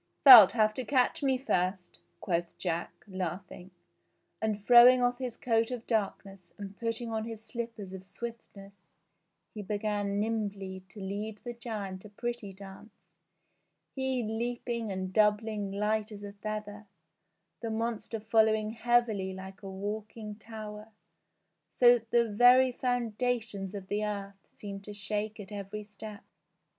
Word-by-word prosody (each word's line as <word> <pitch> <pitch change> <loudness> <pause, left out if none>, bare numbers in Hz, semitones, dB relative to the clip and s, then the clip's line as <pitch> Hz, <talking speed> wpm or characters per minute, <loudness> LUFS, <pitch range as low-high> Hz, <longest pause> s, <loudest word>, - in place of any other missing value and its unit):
"Thou'lt 240 -8 +12
have 215 -2 +3
to 255 - -4
catch 255 +1 +1
me 265 -2 +2
first," 185 -7 -2 0.2
quoth 170 -2 -2
Jack, 170 -2 -4
laughing, 185 0 -5 0.7
and 210 -2 -2
throwing 245 +1 +9
off 245 0 +1
his 250 -3 -4
coat 225 -2 +1
of 245 -2 -5
darkness 195 -4 -3
and 200 -1 -8
putting 230 +1 -3
on 220 -1 -1
his 225 -1 -7
slippers 225 -4 -6
of 190 -1 -8
swiftness 200 -2 -9 0.8
he 215 - -6
began 205 0 -2
nimbly 205 -3 -2
to 205 - -12
lead 205 +2 -4
the 240 -1 -5
giant 210 -5 -6
a 210 - -11
pretty 235 -1 -5
dance, 195 +2 -14 0.8
he 265 -2 -1
leaping 235 0 -3
and 185 0 -4
doubling 210 -1 +2
light 210 +2 -1
as 205 -1 -9
a 200 0 -7
feather, 210 0 -6 0.7
the 230 - -4
monster 225 0 -3
following 220 0 +2
heavily 225 -4 +1
like 190 +1 -10
a 195 - -7
walking 210 +2 -5
tower, 215 -1 -9 0.8
so 245 -1 +6
that 225 0 -26
the 235 0 +3
very 245 +4 +6
foundations 235 -5 -2
of 195 -2 -7
the 210 +2 -1
earth 200 -2 -5
seemed 200 -1 -8
to 210 - -8
shake 210 +2 -3
at 200 0 -9
every 205 +1 -6
step. 210 0 -10
215 Hz, 140 wpm, -30 LUFS, 200-230 Hz, 0.8 s, Thou'lt